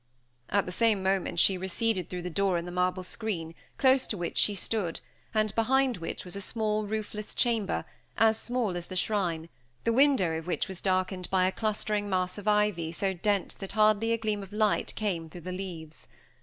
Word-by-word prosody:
At 200 0 +2
the 180 - -5
same 215 -1 +2
moment 190 -2 0
she 185 +2 +4
receded 190 0 0
through 180 -1 -5
the 180 - -4
door 195 0 +2
in 170 - -3
the 175 - -6
marble 180 +1 0
screen, 180 -4 -3 0.2
close 260 -1 +4
to 210 - -2
which 175 -1 -3
she 205 - +4
stood, 195 -3 -1 0.3
and 215 -1 +1
behind 260 +2 +2
which 165 +1 -5
was 180 - -5
a 200 - -4
small 215 0 -1
roofless 210 0 -4
chamber, 230 -5 +1 0.3
as 220 0 +5
small 230 -4 -1
as 175 -1 -4
the 185 - -7
shrine, 180 -4 0 0.4
the 230 - +2
window 225 - +4
of 165 - -11
which 180 - -1
was 190 -2 -6
darkened 185 -1 0
by 185 -1 +3
a 185 - +2
clustering 210 -1 -1
mass 185 +1 0
of 205 - -9
ivy 210 -6 +2
so 190 +3 0
dense 200 +2 0
that 195 -1 -7
hardly 215 +1 +4
a 230 - +3
gleam 215 -2 -1
of 195 0 -10
light 210 0 +1
came 175 -7 -2
through 175 +2 -10
the 185 +3 -5
leaves. 175 -4 -7
195 Hz, 200 wpm, -29 LUFS, 180-215 Hz, 0.4 s, as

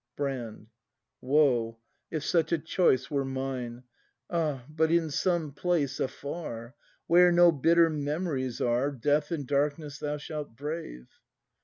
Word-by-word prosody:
Brand. 130 -7 -4 0.6
Woe, 125 -5 +2 0.3
if 155 -2 -3
such 165 -2 +1
a 170 - +3
choice 150 -5 +1
were 140 -1 +1
mine. 130 -2 -4 0.5
Ah, 155 -7 -1
but 155 +1 +1
in 165 -2 +2
some 170 -1 0
place 145 -3 -1
afar. 130 -4 -5 0.3
Where 180 +1 +6
no 175 0 +6
bitter 165 +3 +4
memories 145 -4 -2
are, 120 +4 +2
Death 145 +3 +1
and 155 -5 -3
darkness 145 +1 -1
thou 150 0 -2
shalt 150 -4 -6
brave! 145 - -6
145 Hz, 130 wpm, -28 LUFS, 130-160 Hz, 0.6 s, Where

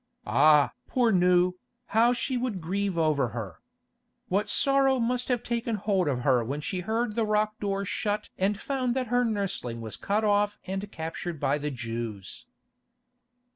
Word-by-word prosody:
Ah! 145 +6 +5 0.2
poor 245 -3 +2
Nou, 180 -1 +4 0.4
how 230 +2 +5
she 245 +2 -1
would 245 -6 -2
grieve 190 +2 -2
over 155 -5 +2
her. 100 -7 -6 0.7
What 200 +3 0
sorrow 275 -1 +3
must 245 +1 0
have 245 -3 0
taken 235 -1 -1
hold 195 -4 0
of 130 -4 0
her 125 -2 +3
when 140 +6 -3
she 180 +5 -3
heard 220 +4 -1
the 230 +1 0
rock 215 0 0
door 200 -1 -1
shut 210 +2 -2
and 200 +2 0
found 260 -3 -1
that 255 -3 -1
her 245 0 +4
nursling 195 - -2
was 110 -2 -7
cut 210 +2 0
off 205 0 +2
and 195 +2 -4
captured 165 0 -5
by 140 +2 +1
the 150 +1 -2
Jews. 115 -6 -6
200 Hz, 165 wpm, -27 LUFS, 150-230 Hz, 0.7 s, Ah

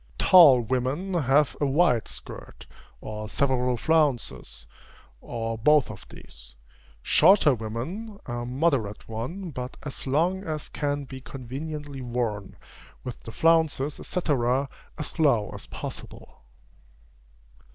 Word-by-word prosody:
Tall 150 - +8
women 130 - -2
have 145 -3 +3
a 145 - +3
wide 140 -5 +2
skirt, - - -9 0.4
or 110 0 -6
several 125 -2 +1
flounces, 140 - 0 0.6
or 115 -1 -4
both 150 +3 +4
of - - -12
these: - - -13 0.5
shorter 165 -3 +5
women, 130 - -5
a 120 -1 -4
moderate 125 -5 -1
one, 160 - -5
but 125 -1 -6
as 145 -2 -6
long 175 +8 +1
as 155 -5 -4
can 145 -1 -2
be 130 -1 -9
conveniently 140 +2 -7
worn, 120 -5 -3 0.5
with 125 -2 -6
the 115 - -9
flounces, 160 -1 +2
&c., - - -2 0.8
as 150 +3 -7
low 120 -10 +3
as - - -9
possible. 65 - -9
135 Hz, 115 wpm, -26 LUFS, 120-155 Hz, 0.8 s, Tall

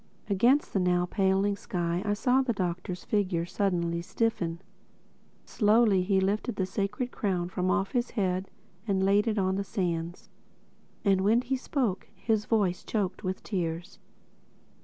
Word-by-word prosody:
Against 245 +9 +3
the 195 - +2
now 180 -1 +2
paling 195 +1 +1
sky 175 -4 -2
I 205 0 0
saw 250 +5 +3
the 255 -3 0
Doctor's 180 -1 -3
figure 185 -5 0
suddenly 170 -3 -1
stiffen. 175 -4 -1 0.9
Slowly 210 -3 +3
he 190 +1 +2
lifted 205 +5 0
the 190 - 0
Sacred 205 +6 -2
Crown 180 -4 -1
from 185 0 -1
off 195 0 +1
his 245 -1 0
head 185 -2 -1 0.4
and 190 -2 +1
laid 205 +3 +3
it 220 -1 0
on 190 -1 +1
the 200 - -1
sands. 175 -3 -3 0.8
And 195 -1 +4
when 220 +5 +4
he 260 +2 -1
spoke 255 -6 -2
his 220 -2 0
voice 200 -6 +2
was - - -33
choked 195 -2 -2
with 185 0 -3
tears. 175 -2 -3
195 Hz, 155 wpm, -28 LUFS, 180-210 Hz, 0.9 s, And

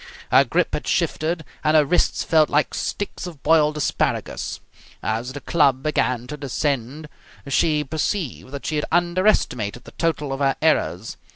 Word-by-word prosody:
Her - - +7
grip - - 0
had - - -3
shifted, 160 +1 0 0.2
and 155 +1 +4
her 150 - +5
wrists 175 +5 +1
felt 155 -2 +3
like 150 +1 +1
sticks 205 -2 -4
of 160 -6 -11
boiled 155 -2 +3
asparagus. 150 - -1 0.4
As 115 +4 -2
the 145 - -7
club 140 -5 +2
began 125 -5 0
to 150 +4 -7
descend 140 +1 -2 0.4
she 150 +2 +2
perceived 155 -1 -3
that 140 -1 -7
she 155 - -1
had 150 - 0
underestimated 175 - +1
the - - -13
total 150 -4 -1
of 135 - -4
her 135 -1 +2
errors. 115 - 0
150 Hz, 160 wpm, -22 LUFS, 135-160 Hz, 0.4 s, Her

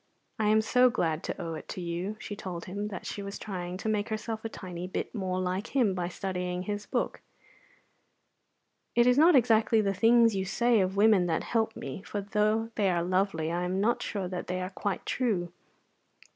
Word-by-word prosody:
I 215 - +2
am 215 +1 +5
so 250 +3 +4
glad 165 -8 0
to - - -4
owe 165 -1 -4
it 155 - -7
to - - -6
you." 175 +4 -3
She 205 - -6
told 180 -4 -6
him 200 +3 -4
that 200 -3 -7
she 205 - -4
was 200 0 -6
trying 180 -3 -5
to 200 - -5
make 210 0 0
herself 220 0 -4
a 225 - -3
tiny 180 -4 -7
bit 185 - -4
more 185 -4 -2
like 185 +6 -3
him 235 -8 +3
by 180 -1 -2
studying 180 -1 -3
his 205 +1 -4
book. - - -2 1.7
"It 240 - +5
is 250 +2 +5
not 330 +1 +7
exactly 225 -3 +4
the 200 -2 +1
things 230 +2 +5
you 190 - 0
say 235 +4 +2
of 190 +1 0
women 205 -4 +5
that 160 -2 0
help 225 -1 0
me, 135 +7 -6
for 205 - -4
though 215 +3 0
they 205 -3 +1
are 170 -2 +1
lovely 180 -3 0
I 175 +1 -1
am 185 +2 -1
not 225 +4 +2
sure 195 -3 -3
that 180 -1 -5
they 180 0 -2
are 185 +1 -4
quite 200 0 -3
true. 190 -9 -1
200 Hz, 205 wpm, -29 LUFS, 180-220 Hz, 1.7 s, not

